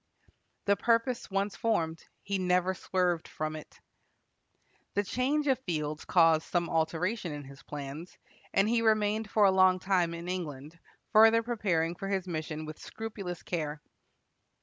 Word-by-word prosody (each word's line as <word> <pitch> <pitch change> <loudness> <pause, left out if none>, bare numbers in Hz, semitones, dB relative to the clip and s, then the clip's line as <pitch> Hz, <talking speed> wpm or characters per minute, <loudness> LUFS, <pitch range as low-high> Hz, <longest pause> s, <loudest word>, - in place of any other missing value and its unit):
The 200 - +4
purpose 230 +4 +1
once 195 +1 -1
formed, 165 -9 -1 0.2
he 200 -1 -1
never 180 0 +2
swerved 180 -2 0
from 155 0 -4
it. 155 - -11 1.2
The 205 - +2
change 265 +8 0
of 265 -3 +2
fields 155 - -3
caused 165 -3 +5
some 175 -1 0
alteration 170 +4 0
in 145 -1 -6
his 135 0 -13
plans, 150 +4 -7 0.3
and 195 +1 +3
he 230 +1 +2
remained 215 -1 +2
for 210 -1 +4
a 185 -1 +5
time 180 -2 +1
in 170 +1 -7
England, 160 -3 -5 0.3
further 225 +1 +7
preparing 190 -8 0
for 195 +3 -6
his 190 -2 -1
mission 155 -2 -4
with 155 0 -8
scrupulous 205 -5 -6
care. 155 -3 -3
180 Hz, 145 wpm, -30 LUFS, 160-210 Hz, 1.2 s, further